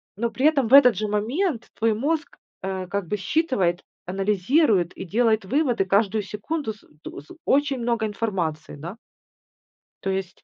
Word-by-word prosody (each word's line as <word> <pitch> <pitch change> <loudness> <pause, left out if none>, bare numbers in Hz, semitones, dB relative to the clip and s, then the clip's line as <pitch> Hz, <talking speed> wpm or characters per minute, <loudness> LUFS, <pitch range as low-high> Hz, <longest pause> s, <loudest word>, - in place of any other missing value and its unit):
но 235 +3 -1
при 265 - -1
этом 280 -7 +2
в 255 - -2
этот 250 -6 +8
же 215 - -1
момент 230 - -1
твой 225 -1 +2
мозг, 295 +6 -2 0.3
а, 190 -1 -3
как 200 -2 -3
бы 210 - -1
считывает, 190 - 0 0.2
анализирует 195 - +2
и - - -5
делает 220 +1 +1
выводы, 250 -4 +1
каждую 205 +2 +1
секунду 220 - -4
с 210 - -21
э - - -22 0.2
т - - -7
с 145 - -23 0.2
очень 280 -1 +2
много 235 -2 0
информации, 185 -8 -3
да. 170 +9 -8 1.1
То 195 - -1
есть 190 -1 -4
215 Hz, 165 wpm, -24 LUFS, 190-260 Hz, 1.1 s, этот